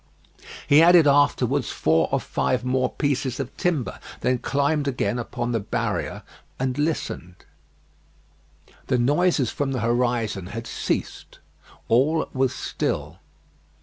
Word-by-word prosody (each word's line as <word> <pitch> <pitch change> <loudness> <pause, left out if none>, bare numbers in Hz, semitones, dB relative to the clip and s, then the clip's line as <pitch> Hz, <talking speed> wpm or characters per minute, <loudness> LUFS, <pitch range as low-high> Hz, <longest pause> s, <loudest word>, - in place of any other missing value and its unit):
He 145 +2 +7
added 170 -1 +7
afterwards 145 0 +2
four 80 0 +1
or - - +2
five 125 -1 -1
more 130 0 +1
pieces 135 -3 -1
of 135 -1 -5
timber; 165 -9 -1 0.2
then 125 -1 +1
climbed 140 +2 0
again 125 -4 -1
upon 120 0 -3
the 115 - 0
barrier 100 - -3 0.4
and 130 -1 -1
listened. 145 - -3 1.4
The 125 - +2
noises 145 +1 +2
from 140 -2 -2
the 125 - -2
horizon 115 -5 0
had 115 +3 -6
ceased; - - -4 0.5
all 145 +7 +2
was 130 -1 +1
still. - - -3
130 Hz, 120 wpm, -24 LUFS, 120-145 Hz, 1.4 s, He